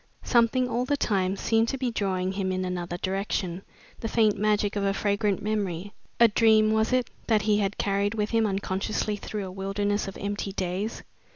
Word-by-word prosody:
Something 245 +1 +3
all 245 0 0
the 285 +3 0
time 195 -6 +1
seemed 225 +3 +2
to 270 - -2
be 255 -2 -1
drawing 190 -4 -1
him 190 -1 -2
in 185 0 -1
another 175 -1 -3
direction, 190 -1 -2 0.4
the 225 - -3
faint 220 -2 +3
magic 210 0 +1
of 200 - -1
a 195 0 +1
fragrant 200 -1 0
memory 200 -3 -2 0.3
a 235 - +8
dream, 215 0 +4
was 220 +2 +2
it 255 -1 +1 0.2
that 215 -3 +3
he 210 0 +3
had 200 0 -1
carried 200 +1 0
with 210 -1 -1
him 225 -1 +3
unconsciously 195 +2 -1
through 205 0 -5
a 185 - -7
wilderness 200 +2 -1
of 195 - -7
empty 200 0 -3
days? 190 +4 -3
205 Hz, 190 wpm, -27 LUFS, 195-220 Hz, 0.4 s, a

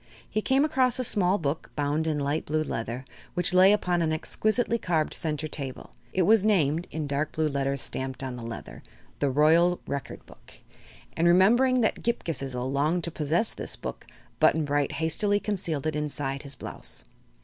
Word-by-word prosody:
He 215 - -1
came 270 +5 +3
across 260 -5 +2
a 255 - -1
small 195 -4 +2
book, 150 -2 -3
bound 150 +2 0
in 155 -2 0
light 145 +2 -1
blue 155 +1 0
leather, 120 -1 -4 0.3
which 180 +1 +2
lay 185 +2 +7
upon 180 -4 +1
an 160 -1 +1
exquisitely 215 +8 0
carved 160 -6 0
center 155 -2 -2
table. 140 -3 -5 0.2
It 185 - +1
was 215 +2 +5
named, 170 -6 +2
in 155 -1 -4
dark 145 +2 -2
blue 155 0 +1
letters 140 -1 -1
stamped 130 0 -3
on 130 -2 -4
the 120 - -8
leather, 115 -1 -8 0.4
"The 140 - +1
Royal 165 +6 +4
Record 140 -1 -5
Book," - - -17 0.6
and 170 - +2
remembering 240 +9 +5
that 220 - 0
Ghip 235 0 -1
Ghisizzle 135 -6 -3
longed 155 +5 +1
to 170 - -3
possess 160 +9 +1
this - - -3
book - - -7 0.3
Button 160 -1 +4
Bright 145 -1 0
hastily 200 +6 +1
concealed 175 -9 -2
it 155 -1 -1
inside 145 -2 -3
his 140 -2 -7
blouse. - - -5
155 Hz, 180 wpm, -27 LUFS, 140-185 Hz, 0.6 s, lay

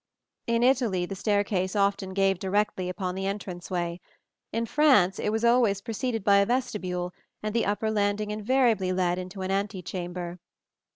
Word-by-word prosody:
In 235 0 +2
Italy 240 -8 +2
the 195 - -6
staircase 200 -1 0
often 200 -1 0
gave 195 -2 +2
directly 190 -1 0
upon 185 0 -3
the 195 +1 -3
entranceway; 180 -3 -4 0.5
in 230 0 -1
France 230 -10 +4
it - - 0
was 220 +2 0
always 235 -4 +4
preceded 225 +1 -3
by 200 0 +5
a 200 - +4
vestibule, 185 -8 -2 0.3
and 215 0 -2
the 230 -2 +1
upper 215 +2 0
landing 205 0 0
invariably 215 -3 +2
led 180 -1 +1
into 185 +1 -6
an 185 - -2
antechamber. 180 -3 -3
200 Hz, 155 wpm, -27 LUFS, 185-220 Hz, 0.5 s, by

